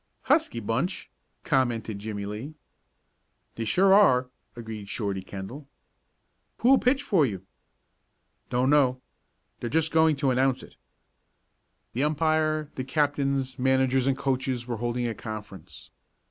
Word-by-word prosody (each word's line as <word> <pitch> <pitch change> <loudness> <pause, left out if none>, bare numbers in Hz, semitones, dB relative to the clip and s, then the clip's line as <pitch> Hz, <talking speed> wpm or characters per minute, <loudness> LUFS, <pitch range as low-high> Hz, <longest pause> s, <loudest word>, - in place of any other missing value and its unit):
"Husky 115 - +2
bunch," 120 - -2 0.3
commented 120 -7 0
Jimmie 100 -1 -5
Lee. 110 +10 -6 1.0
"They 115 - -4
sure 190 - +4
are," 130 -11 +5 0.2
agreed 110 -4 -8
Shorty 100 -4 -2
Kendall. 100 +10 -8 0.9
"Who'll 260 +3 +5
pitch 270 +3 +2
for 190 - +3
you?" 95 -8 -2 1.0
"Don't 125 +2 +2
know. 130 -4 +3 0.6
They're 120 - -4
just 160 +3 +1
going 160 -1 +4
to 135 -1 +1
announce 130 0 +1
it." - - -15 1.2
The 130 - 0
umpire, 155 0 +1
the 130 - -4
captains, 140 -2 0
managers, 130 0 +2
and 135 -1 +1
coaches 130 -3 -1
were 120 -2 -4
holding 120 +1 -2
a 115 - -2
conference. 105 -6 -9
130 Hz, 125 wpm, -26 LUFS, 115-150 Hz, 1.2 s, are